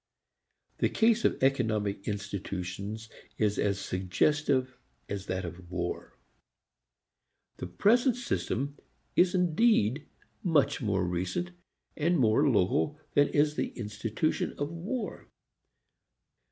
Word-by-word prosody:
The - - +3
case 230 +1 +3
of - - +3
economic 110 -7 +1
institutions 100 +1 -4 0.3
is 105 -1 +1
as 100 -1 +1
suggestive 130 +8 +1 0.3
as 100 -1 -5
that 95 0 -2
of 85 0 -9
war. 85 -1 -4 1.4
The - - -5
present 235 - +3
system 145 - -2 0.4
is 180 +1 +4
indeed 170 - +2 0.3
much 145 -6 +2
more 100 -5 +1
recent 90 - -2 0.4
and 170 +3 +2
more 130 +3 +4
local 130 +7 +1
than 145 0 +5
is 150 0 +2
the - - -3
institution 110 +6 -2
of 145 +2 -2
war. 205 +7 -5
120 Hz, 105 wpm, -29 LUFS, 100-155 Hz, 1.4 s, than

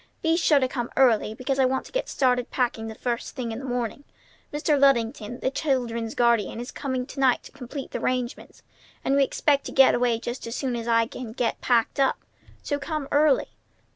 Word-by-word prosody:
Be 325 0 +3
sure 320 -3 +4
to 260 - +1
come 240 -2 -4
early, 225 -4 +3
because 265 +3 -2
I 265 - +5
want 260 +1 0
to - - -13
get - - -2
started 250 -2 +1
packing 235 -3 -1
the 220 - -7
first 240 +1 -3
thing 245 -4 -3
in 225 - -5
the 270 - -7
morning. 245 +1 -3 0.5
Mr. 295 +1 +1
Luddington, 245 -3 +2
the 260 - 0
children's 240 -6 -1
guardian, 235 -3 +2
is 245 - -6
coming 260 -2 -3
to 280 - -9
night 260 -2 +3
to - - -13
complete 275 0 -8
the - - -3
arrangements, 250 -1 -3 0.4
and 275 - +2
we 280 - +5
expect 280 +1 +1
to - - -6
get 270 -1 +6
away 240 -1 +2
just 240 +1 -6
as 230 - -5
soon 260 -3 -2
as 235 0 -4
I 230 -1 +3
can 230 -1 -8
get 240 -1 -1
packed 240 +2 +1
up. 270 - +3 0.5
So 285 -1 -2
come 300 -1 -4
early." 290 -1 +3
255 Hz, 210 wpm, -25 LUFS, 235-275 Hz, 0.5 s, get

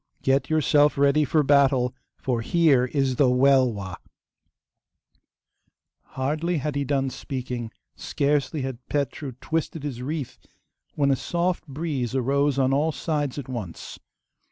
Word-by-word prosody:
Get 135 +1 +2
yourself 150 -2 +3
ready 140 +2 +4
for 150 +2 +2
battle, 135 -3 +3 0.2
for 125 -3 -1
here 145 -2 +3
is 130 -1 -1
the 135 -3 +4
Welwa!' 125 -8 +2 2.2
Hardly 155 +6 0
had 145 0 -3
he 140 - 0
done 135 -1 0
speaking, 125 -4 -5 0.3
scarcely 145 0 -1
had 130 -3 -4
Petru 140 -1 -2
twisted 160 -1 -3
his 130 -5 -5
wreath, 145 0 -4 0.6
when 140 -2 +2
a - - +4
soft 175 +4 -2
breeze 140 -4 -3
arose 140 +2 +1
on 135 0 +2
all 150 +4 +2
sides 150 -4 -2
at 140 - -5
once. 115 -10 -7
140 Hz, 130 wpm, -25 LUFS, 130-150 Hz, 2.2 s, ready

